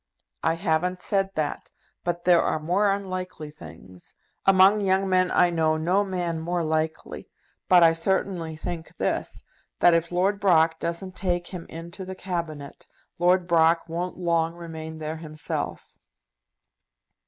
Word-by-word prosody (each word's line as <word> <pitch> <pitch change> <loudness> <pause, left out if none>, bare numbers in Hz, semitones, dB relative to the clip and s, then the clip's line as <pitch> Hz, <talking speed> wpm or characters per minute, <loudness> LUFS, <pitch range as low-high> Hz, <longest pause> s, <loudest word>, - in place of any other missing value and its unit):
"I 165 - +1
haven't 180 +1 -1
said 195 -1 0
that; 155 -2 -3 0.3
but 175 0 -3
there 175 -2 +6
are - - 0
more 180 +7 +1
unlikely 185 -5 -4
things. 90 - -14 0.3
Among 195 +2 +6
young 195 0 +2
men 185 -1 +3
I 180 -1 +3
know 160 -2 +1
no 180 +6 +2
man 175 -4 -2
more 170 +1 -1
likely. 160 0 -3 0.4
But 180 -2 +7
I 165 0 +6
certainly 165 -1 -1
think 160 +1 -7
this, - - -2 0.3
that 175 - +5
if 165 0 +1
Lord 190 +3 +1
Brock 165 -4 +3
doesn't 175 +3 -4
take 175 -2 -1
him 180 -3 -8
into 170 +3 -8
the 190 0 -7
Cabinet, 165 -6 -5 0.3
Lord 180 +1 +3
Brock 165 0 +3
won't 175 +2 -4
long 170 -2 0
remain 160 -2 -8
there 155 0 -5
himself." 155 -1 -5
170 Hz, 140 wpm, -25 LUFS, 160-185 Hz, 0.4 s, But